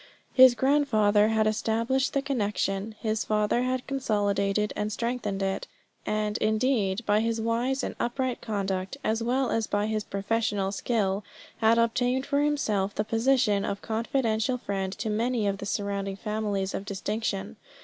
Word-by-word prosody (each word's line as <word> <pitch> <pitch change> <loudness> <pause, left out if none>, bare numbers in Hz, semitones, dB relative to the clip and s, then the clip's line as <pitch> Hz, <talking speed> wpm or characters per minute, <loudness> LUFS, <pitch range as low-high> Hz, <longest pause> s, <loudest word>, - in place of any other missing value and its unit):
His 260 -2 +8
grandfather 220 -6 +3
had 220 0 +2
established 230 +5 0
the 275 - 0
connection; 210 -5 -1
his 220 -1 0
father 210 +2 +1
had 255 0 -1
consolidated 210 -5 0
and 210 0 -2
strengthened 220 -4 -2
it, 195 0 -2 0.4
and, 215 0 -1
indeed, 220 -2 +1
by 205 +1 +3
his 225 0 0
wise 240 +4 0
and - - -3
upright 255 +1 -1
conduct, 195 0 -2
as 220 +1 0
well 250 +2 +1
as 225 -1 0
by 205 0 0
his 215 -1 -1
professional 200 -1 -1
skill, 200 -2 0 0.3
had 225 +1 +4
obtained 245 +3 +1
for 285 0 +1
himself 215 -10 0
the 210 - 0
position 225 -2 +2
of 200 - -3
confidential 230 +1 0
friend 195 -5 -3
to 215 +2 -3
many 230 +1 0
of 195 -1 -1
the 200 - -5
surrounding 200 -1 -2
families 205 -2 -2
of - - -3
distinction. 200 +1 -3
220 Hz, 150 wpm, -27 LUFS, 205-240 Hz, 0.4 s, His